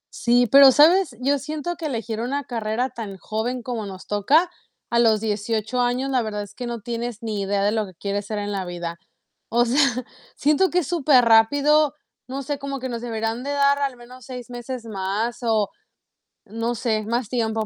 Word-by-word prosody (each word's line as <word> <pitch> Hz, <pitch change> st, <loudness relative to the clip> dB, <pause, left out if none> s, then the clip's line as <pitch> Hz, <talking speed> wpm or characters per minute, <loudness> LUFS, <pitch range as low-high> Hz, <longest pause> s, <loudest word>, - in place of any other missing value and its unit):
Sí, 245 Hz, +1 st, +3 dB
pero 275 Hz, -1 st, +9 dB
¿sabes? 310 Hz, -1 st, +5 dB
Yo 280 Hz, +2 st, +2 dB
siento 310 Hz, +5 st, -4 dB
que 325 Hz, -1 st, -4 dB
elegir 225 Hz, -4 st, -3 dB
una 275 Hz, +4 st, -2 dB
carrera 235 Hz, +1 st, -2 dB
tan 215 Hz, -5 st, -7 dB
joven 230 Hz, +6 st, -3 dB
como 225 Hz, -4 st, -4 dB
nos 190 Hz, -1 st, -9 dB
toca 290 Hz, -, +2 dB, 0.4 s
a 235 Hz, -, +3 dB
los 220 Hz, -3 st, +4 dB
18 220 Hz, +2 st, -1 dB
años, 250 Hz, +3 st, 0 dB
la 255 Hz, -2 st, +2 dB
verdad 210 Hz, -2 st, -3 dB
es 205 Hz, -, -12 dB
que 245 Hz, -, -6 dB
no 235 Hz, -2 st, -5 dB
tienes 235 Hz, +1 st, -5 dB
ni 215 Hz, -3 st, -2 dB
idea 200 Hz, 0 st, 0 dB
de 205 Hz, -, +2 dB
lo 215 Hz, -2 st, -1 dB
que 185 Hz, -, -14 dB
quieres 200 Hz, +3 st, -3 dB
ser 215 Hz, -, -3 dB
en 205 Hz, 0 st, -3 dB
la 195 Hz, -2 st, -2 dB
vida. 175 Hz, -1 st, -6 dB, 0.5 s
O 240 Hz, +1 st, +3 dB
sea, 245 Hz, +4 st, 0 dB, 0.6 s
siento 305 Hz, +6 st, +2 dB
que 360 Hz, -, +1 dB
es 345 Hz, -, 0 dB
superrápido, 285 Hz, 0 st, +4 dB, 0.3 s
no 270 Hz, +2 st, -5 dB
sé, 285 Hz, +1 st, -3 dB
como 275 Hz, -1 st, -5 dB
que 260 Hz, -, -4 dB
nos 235 Hz, -2 st, -5 dB
deberián 225 Hz, +1 st, -3 dB
de 285 Hz, -, -3 dB
dar 280 Hz, 0 st, +3 dB
al 270 Hz, -3 st, -2 dB
menos 250 Hz, +1 st, -13 dB
6 250 Hz, -1 st, -8 dB
meses 245 Hz, 0 st, -6 dB
más 210 Hz, +3 st, -2 dB
o 220 Hz, -3 st, +1 dB, 0.8 s
no 230 Hz, +3 st, -3 dB
sé, 220 Hz, -2 st, -1 dB
más 235 Hz, 0 st, -2 dB
tiempo. 225 Hz, -3 st, -1 dB
235 Hz, 195 wpm, -23 LUFS, 215-270 Hz, 0.8 s, pero